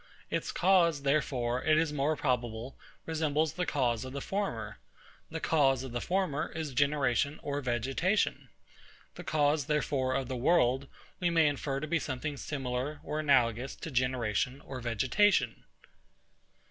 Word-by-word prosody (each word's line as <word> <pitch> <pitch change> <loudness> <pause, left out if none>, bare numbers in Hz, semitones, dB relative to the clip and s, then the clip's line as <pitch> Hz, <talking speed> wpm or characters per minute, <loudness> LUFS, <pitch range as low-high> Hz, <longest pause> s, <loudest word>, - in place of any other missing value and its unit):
Its - - -1
cause, 170 -5 +3
therefore, 130 -4 0
it 155 0 +4
is 155 -1 +1
more 150 +2 +1
probable, 120 -3 -2 0.3
resembles 155 -1 0
the 180 -2 -2
cause 125 -4 0
of 130 0 -7
the 140 - -3
former. 120 - -3 0.5
The 160 - -4
cause 135 -6 +2
of 130 - -7
the 120 0 -3
former 180 -6 -1
is 155 -4 -4
generation 140 +1 +1
or 145 0 -2
vegetation. 135 - 0 0.6
The - - -9
cause, 145 -2 +1
therefore, 135 -3 0
of 135 -2 -1
the 130 - -3
world, 135 -1 +2 0.3
we 175 -2 +2
may 165 -2 +4
infer 140 -1 -1
to 155 - -3
be 165 +2 0
something 145 +2 -4
similar 135 +1 -3
or 150 - -3
analogous 130 -4 +2
to 165 - -7
generation 125 -1 0
or 130 -3 -7
vegetation. 125 - +2
140 Hz, 145 wpm, -31 LUFS, 125-155 Hz, 0.6 s, it